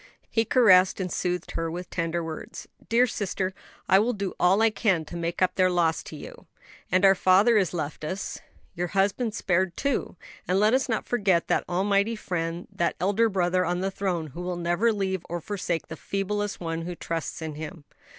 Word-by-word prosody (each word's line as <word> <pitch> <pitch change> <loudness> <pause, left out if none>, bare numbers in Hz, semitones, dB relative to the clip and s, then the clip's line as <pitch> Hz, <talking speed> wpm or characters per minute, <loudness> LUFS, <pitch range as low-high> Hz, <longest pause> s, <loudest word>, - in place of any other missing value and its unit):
He 225 0 +2
caressed 190 -7 +5
and 180 -2 -3
soothed 180 0 -2
her 165 0 -2
with 175 +2 -6
tender 170 0 -1
words. 160 -1 -7 0.2
"Dear 235 +2 +5
sister, 195 -4 -2 0.3
I 190 - +6
will 235 +4 +1
do 200 -3 -3
all 190 +5 +4
I 225 - +4
can 190 -8 +1
to 155 - -9
make 170 +1 -1
up 185 - +2
their 185 -1 +3
loss 170 -2 +1
to - - -8
you. - - -11 0.4
And 185 +2 +4
our 195 - +8
father 195 +5 +4
is 195 -5 +3
left 155 -3 -4
us; 185 +5 -4 0.3
your 175 +1 -2
husband 205 +3 +1
spared, 185 -2 0
too. 280 -8 -1 0.3
And 185 +2 +2
let 215 +3 +4
us 265 0 +1
not 225 - -1
forget 195 -7 +1
that - - 0
almighty 200 +4 +1
Friend, 170 -4 -3
that 170 - -1
Elder 205 +5 +2
Brother 185 -2 +1
on 180 0 -1
the 195 +1 -1
throne, 180 -5 -2
who 175 - -6
will 180 0 -3
never 175 +7 +2
leave 190 -4 -2
or 175 +1 -2
forsake 180 -2 -3
the 160 - -8
feeblest 205 +3 -3
one 165 -1 -3
who 175 +1 -5
trusts 165 -1 -4
in 160 -1 -5
Him." 160 +2 -8
185 Hz, 200 wpm, -26 LUFS, 170-205 Hz, 0.4 s, our